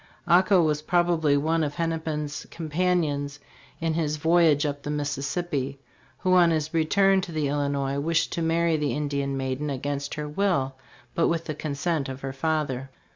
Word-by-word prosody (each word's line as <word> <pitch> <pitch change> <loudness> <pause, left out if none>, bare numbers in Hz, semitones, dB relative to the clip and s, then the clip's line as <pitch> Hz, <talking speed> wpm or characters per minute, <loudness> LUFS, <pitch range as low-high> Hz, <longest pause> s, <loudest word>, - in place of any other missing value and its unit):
Ako 180 +1 +5
was 150 -1 +1
probably 165 -3 +2
one 160 +3 +1
of 145 -1 -3
Hennepin's 160 -3 -3
companions 155 -3 -1 0.4
in 165 -1 0
his 155 -2 -1
voyage 160 -2 +4
up 145 -1 -2
the 145 - -6
Mississippi, 140 -1 -2 0.4
who 185 0 +1
on 175 -2 +6
his 155 -1 -1
return 195 +4 +3
to 180 - -6
the 155 -3 -1
Illi 145 0 0
nois 140 0 -1
wished 165 +3 +1
to 170 - -2
marry 165 0 +2
the 150 -2 -1
Indian 140 -2 -2
maiden 135 +2 -2
against 140 +1 -3
her 150 0 -4
will 150 -5 0 0.4
but 165 - +2
with 165 -1 -1
the 155 - -3
consent 150 0 -2
of 130 0 -7
her 135 0 -4
father. 135 -2 -1
150 Hz, 170 wpm, -26 LUFS, 140-165 Hz, 0.4 s, on